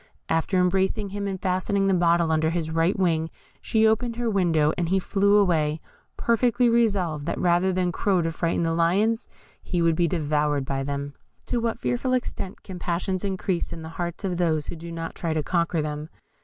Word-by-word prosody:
After 165 Hz, +3 st, +1 dB
embracing 190 Hz, +3 st, +1 dB
him, 200 Hz, +1 st, -4 dB
and 190 Hz, -1 st, -3 dB
fastening 190 Hz, +2 st, 0 dB
the 195 Hz, -, +3 dB
bottle 170 Hz, -2 st, +3 dB
under 160 Hz, 0 st, +2 dB
his 165 Hz, -1 st, -2 dB
right 165 Hz, +4 st, +1 dB
wing, 165 Hz, -4 st, +1 dB, 0.3 s
she 220 Hz, 0 st, +2 dB
opened 230 Hz, +2 st, +2 dB
her 235 Hz, -1 st, -1 dB
window, 165 Hz, -6 st, +2 dB
and 170 Hz, -2 st, -1 dB
he 190 Hz, -, +3 dB
flew 200 Hz, +2 st, +2 dB
away, 160 Hz, -6 st, +2 dB, 0.4 s
perfectly 240 Hz, +1 st, +2 dB
resolved 195 Hz, -10 st, +1 dB
that 170 Hz, -, -2 dB
rather 175 Hz, +1 st, +2 dB
than 180 Hz, -1 st, 0 dB
crow 185 Hz, -1 st, +1 dB
to 165 Hz, -, -1 dB
frighten 165 Hz, +1 st, -1 dB
the 165 Hz, 0 st, 0 dB
lions, 200 Hz, +8 st, +1 dB, 0.3 s
he 180 Hz, -, -2 dB
would 165 Hz, -1 st, +3 dB
be 170 Hz, +1 st, +2 dB
devoured 150 Hz, -3 st, 0 dB
by 135 Hz, 0 st, -2 dB
them. 140 Hz, 0 st, -4 dB, 0.3 s
To 245 Hz, -, -1 dB
what 230 Hz, 0 st, -1 dB
fearful 245 Hz, +2 st, -1 dB
extent 240 Hz, -6 st, -3 dB
can 185 Hz, -2 st, -8 dB
passions 180 Hz, +2 st, -2 dB
increase 190 Hz, -2 st, -2 dB
in 165 Hz, -, -7 dB
the 160 Hz, -, -7 dB
hearts 170 Hz, +3 st, -5 dB
of 185 Hz, -3 st, -1 dB
those 160 Hz, -4 st, +1 dB
who -, -, -6 dB
do 170 Hz, +1 st, -8 dB
not 165 Hz, 0 st, -5 dB
try 165 Hz, -2 st, -3 dB
to 155 Hz, -, 0 dB
conquer 170 Hz, -1 st, 0 dB
them? 150 Hz, +1 st, -5 dB
175 Hz, 195 wpm, -25 LUFS, 160-195 Hz, 0.4 s, the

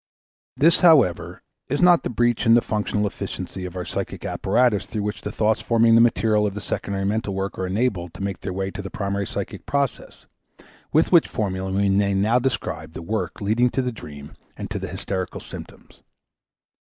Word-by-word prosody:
This, 165 Hz, +4 st, +5 dB
however, 140 Hz, -, +4 dB, 0.3 s
is 145 Hz, -, 0 dB
not 180 Hz, -1 st, +6 dB
the -, -, -3 dB
breach 120 Hz, 0 st, +1 dB
in 115 Hz, -, +7 dB
the 120 Hz, -, +4 dB
functional 105 Hz, -1 st, -1 dB
efficiency 95 Hz, -1 st, -5 dB
of 90 Hz, 0 st, -7 dB
our 90 Hz, -1 st, -4 dB
psychic -, -, -5 dB
apparatus 120 Hz, -5 st, +1 dB
through 110 Hz, -3 st, -3 dB
which 105 Hz, +1 st, -4 dB
the 105 Hz, -, -5 dB
thoughts 110 Hz, 0 st, +1 dB
forming 115 Hz, -1 st, +3 dB
the 115 Hz, -, +7 dB
material 110 Hz, -2 st, +3 dB
of 100 Hz, -, -5 dB
the -, -, -3 dB
secondary 100 Hz, 0 st, -3 dB
mental 105 Hz, -1 st, -1 dB
work 95 Hz, 0 st, -3 dB
are 95 Hz, -, -1 dB
enabled 95 Hz, -4 st, -1 dB
to -, -, -6 dB
make 100 Hz, -1 st, -4 dB
their 95 Hz, -, -4 dB
way 95 Hz, +1 st, -2 dB
into 100 Hz, -, -6 dB
the 95 Hz, -, -7 dB
primary 100 Hz, 0 st, -2 dB
psychic -, -, -6 dB
process 140 Hz, -3 st, -2 dB, 0.7 s
with 160 Hz, +2 st, +3 dB
which 170 Hz, -3 st, +6 dB
formula 95 Hz, -3 st, -3 dB
we 100 Hz, +1 st, +1 dB
may 100 Hz, 0 st, +2 dB
now 110 Hz, +5 st, +3 dB
describe 130 Hz, +1 st, -3 dB
the -, -, -7 dB
work 110 Hz, +5 st, -3 dB
leading 110 Hz, +5 st, +2 dB
to 130 Hz, -, -1 dB
the 125 Hz, -, -1 dB
dream 75 Hz, -9 st, -10 dB, 0.3 s
and -, -, -6 dB
to -, -, -2 dB
the -, -, -5 dB
hysterical 95 Hz, -2 st, -4 dB
symptoms. -, -, -11 dB
105 Hz, 195 wpm, -23 LUFS, 95-120 Hz, 0.7 s, in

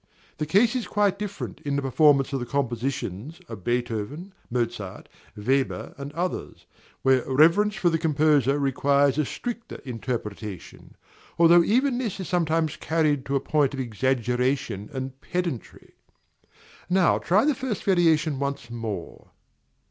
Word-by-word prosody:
The 150 Hz, -, -2 dB
case 215 Hz, -, +3 dB
is 250 Hz, -, -2 dB
quite 200 Hz, -1 st, +1 dB
different 205 Hz, -1 st, -6 dB
in 145 Hz, -1 st, -1 dB
the 140 Hz, -, 0 dB
performance 140 Hz, 0 st, +4 dB
of 135 Hz, -, 0 dB
the 120 Hz, -, -4 dB
compositions 130 Hz, -, -3 dB
of 110 Hz, -5 st, -9 dB
Beethoven, 120 Hz, -, -3 dB, 0.2 s
Mozart, 115 Hz, -5 st, -3 dB, 0.3 s
Weber, 130 Hz, +6 st, -1 dB
and 140 Hz, 0 st, -7 dB
others, 180 Hz, +3 st, -4 dB, 0.4 s
where 130 Hz, -2 st, +4 dB
reverence 170 Hz, +10 st, +4 dB
for 175 Hz, -5 st, +2 dB
the 165 Hz, -, +1 dB
composer 150 Hz, -3 st, +3 dB
requires 140 Hz, 0 st, +2 dB
a 150 Hz, -, +2 dB
stricter 235 Hz, -, -6 dB
interpretation, 105 Hz, -5 st, -6 dB, 0.4 s
although 170 Hz, 0 st, +7 dB
even 250 Hz, +5 st, +2 dB
this 225 Hz, -7 st, -3 dB
is 190 Hz, -, -4 dB
sometimes 165 Hz, -3 st, 0 dB
carried 150 Hz, -4 st, 0 dB
to 140 Hz, -, -1 dB
a -, -, +3 dB
point 145 Hz, 0 st, +1 dB
of -, -, -6 dB
exaggeration 125 Hz, -1 st, -1 dB
and 130 Hz, 0 st, -6 dB
pedantry. 175 Hz, -9 st, -4 dB, 1.0 s
Now 185 Hz, -1 st, +3 dB
try 200 Hz, +8 st, +3 dB
the 300 Hz, -, +3 dB
first 255 Hz, -6 st, -4 dB
variation 165 Hz, -6 st, +2 dB
once 140 Hz, -3 st, -3 dB
more. 110 Hz, -7 st, -6 dB
140 Hz, 140 wpm, -25 LUFS, 125-175 Hz, 1.0 s, although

